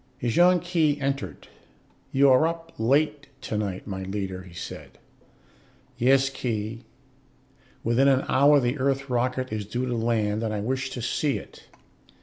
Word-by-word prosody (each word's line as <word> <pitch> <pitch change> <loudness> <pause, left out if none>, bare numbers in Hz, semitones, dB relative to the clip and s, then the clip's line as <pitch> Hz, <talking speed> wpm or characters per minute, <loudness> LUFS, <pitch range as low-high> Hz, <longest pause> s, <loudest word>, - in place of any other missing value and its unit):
Ejon 175 +9 +4
Khee 165 -4 +1
entered. 135 - -3 0.6
"You 135 0 +5
are 130 +5 +5
up 165 0 -5
late 145 +5 +1
tonight, 105 -3 -3
my 95 -2 -5
leader," 95 -1 -4
he 90 -2 -14
said. - - -8 1.0
"Yes, 135 +2 +4
Khee. 115 -2 -4 1.0
Within 120 +4 +3
an 135 -1 +3
hour 145 +2 +5
the 125 +2 -1
Earth 135 0 0
rocket 130 0 -1
is 105 -2 -4
due 120 +4 -2
to 125 -1 -2
land, 110 -2 0
and 110 -1 -1
I - - -2
wish 130 +5 -2
to 125 -3 -6
see 140 +3 0
it. - - -13
130 Hz, 145 wpm, -25 LUFS, 110-140 Hz, 1.0 s, You